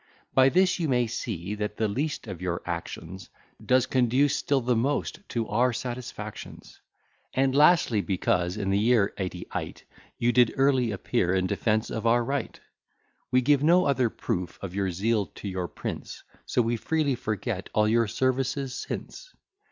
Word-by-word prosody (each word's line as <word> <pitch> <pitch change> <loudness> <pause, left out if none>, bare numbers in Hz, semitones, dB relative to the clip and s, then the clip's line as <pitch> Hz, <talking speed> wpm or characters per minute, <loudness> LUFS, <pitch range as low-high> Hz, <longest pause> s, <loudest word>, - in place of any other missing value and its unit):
By 130 0 +6
this 185 +4 +3
you 160 -3 0
may 125 -2 +2
see 105 -4 -4
that 105 0 -4
the 110 - +1
least 145 +9 -2
of 95 -5 -7
your 90 -2 -2
actions 85 +1 -6 0.3
Does 130 -1 +3
conduce 130 +3 +2
still 140 -1 +1
the 125 0 +1
most 135 +8 -1
to 115 -2 -2
our 125 +4 +2
satisfactions. 120 -4 -7 0.6
And 135 0 +2
lastly, 145 - +4
because 90 -1 0
in 95 -2 -1
the 100 - +2
year 110 -2 +3
eighty 90 -2 -4
eight - - -5 0.3
You 120 +1 +2
did 120 -2 +4
early 135 -3 +3
appear 95 -2 0
in 95 -1 +1
defence 105 +3 0
of 110 +1 -2
our 120 +1 +4
right, 140 +4 -3 0.7
We 130 - +3
give 140 +2 +3
no 175 +4 +5
other 130 -4 +2
proof 90 -4 -4
of 95 -2 -5
your 100 -1 0
zeal 105 +3 0
to - - -7
your 90 -2 -3
Prince; - - -6 0.2
So 125 - +2
we 115 +1 0
freely 155 +2 0
forget 110 -3 -3
all 105 0 +4
your 115 +1 +3
services 130 +3 -1
since. - - -7
115 Hz, 165 wpm, -27 LUFS, 100-130 Hz, 0.7 s, By